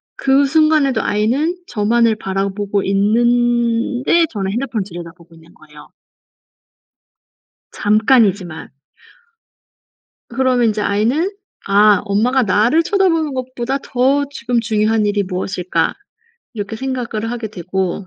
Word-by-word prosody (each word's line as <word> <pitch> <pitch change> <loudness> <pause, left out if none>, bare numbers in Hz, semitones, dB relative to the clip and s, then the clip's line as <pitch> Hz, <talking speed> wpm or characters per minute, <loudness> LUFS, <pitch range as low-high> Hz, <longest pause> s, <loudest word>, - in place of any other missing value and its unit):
그 275 +1 +2
순간에도 310 -2 +2
아이는 250 - 0
저만을 225 +1 +1
바라보고 195 0 -2
있는데 240 - +1
저는 195 -3 -3
핸드폰을 235 -2 -2
들여다보고 170 -1 -11
있는 165 +1 -19
거예요. 150 -1 -16 1.8
잠깐이지만. 205 -6 +1 1.6
그러면 255 -3 +1
인제 215 -1 -1
아이는 235 - 0 0.4
'아 205 0 +4
엄마가 240 +6 +1
나를 225 - +2
쳐다보는 335 -5 +1
것보다 255 0 -3
더 270 +2 +1
지금 240 -3 -1
중요한 215 -1 +1
일이 205 0 0
무엇일까?' 180 -2 -2 0.6
이렇게 210 0 -5
생각을 235 -3 -4
하게 235 -2 -4
되고 185 -1 -4
225 Hz, 270 characters per minute, -17 LUFS, 200-255 Hz, 1.8 s, 아